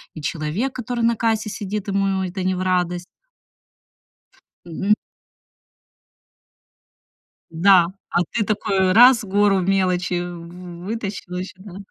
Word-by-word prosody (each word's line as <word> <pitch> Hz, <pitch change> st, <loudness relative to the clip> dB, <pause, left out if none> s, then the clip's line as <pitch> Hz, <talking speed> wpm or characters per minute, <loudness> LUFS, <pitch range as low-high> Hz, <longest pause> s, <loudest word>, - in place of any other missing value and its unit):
и 155 Hz, -, -7 dB
человек, 165 Hz, -, -2 dB
который 245 Hz, -1 st, -3 dB
на 230 Hz, 0 st, +3 dB
кассе 220 Hz, -1 st, 0 dB
сидит, 205 Hz, -1 st, -4 dB
ему 195 Hz, -1 st, 0 dB
это 185 Hz, +1 st, -4 dB
не 185 Hz, 0 st, 0 dB
в 180 Hz, -, -3 dB
радость. 180 Hz, -1 st, 0 dB, 1.6 s
Мгм. 190 Hz, +5 st, 0 dB, 2.6 s
Да, 175 Hz, +1 st, +5 dB, 0.2 s
а -, -, +1 dB
ты 220 Hz, -, 0 dB
такой 195 Hz, -3 st, +1 dB
раз, 245 Hz, +1 st, +7 dB
гору 200 Hz, 0 st, +2 dB
мелочи 180 Hz, -1 st, 0 dB
вытащил 180 Hz, +3 st, -6 dB
ещё, 185 Hz, 0 st, -6 dB
да. 195 Hz, -3 st, -10 dB
190 Hz, 110 wpm, -21 LUFS, 180-210 Hz, 2.6 s, раз